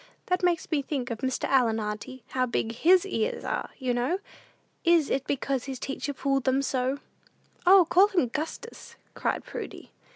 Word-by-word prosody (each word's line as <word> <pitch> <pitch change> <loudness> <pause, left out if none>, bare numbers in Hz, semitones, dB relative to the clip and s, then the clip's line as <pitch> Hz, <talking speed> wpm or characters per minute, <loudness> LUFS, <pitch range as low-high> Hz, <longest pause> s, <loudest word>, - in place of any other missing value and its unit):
That 365 0 0
makes 350 -2 +1
me 300 -3 +2
think 270 -3 -3
of 225 - -4
Mr. 260 -1 -2
Allen, 235 -5 +3
auntie. 215 +4 -5
How 255 -1 0
big 230 -1 -1
his 350 +10 +4
ears 455 +5 -2
are, - - -2
you 255 -3 -1
know? 245 +9 0 0.7
Is 335 -4 +4
it 270 0 -1
because 275 -2 -1
his 270 -2 -5
teacher 275 +2 -4
pulled 275 -1 -1
them 265 +1 +2
so?" 260 0 0 0.7
"O, 375 -1 +8
call 380 +4 +6
him 370 -11 +1
'Gustus,'" 315 - -6 0.2
cried - - -1
Prudy. - - -8
275 Hz, 170 wpm, -27 LUFS, 255-340 Hz, 0.7 s, O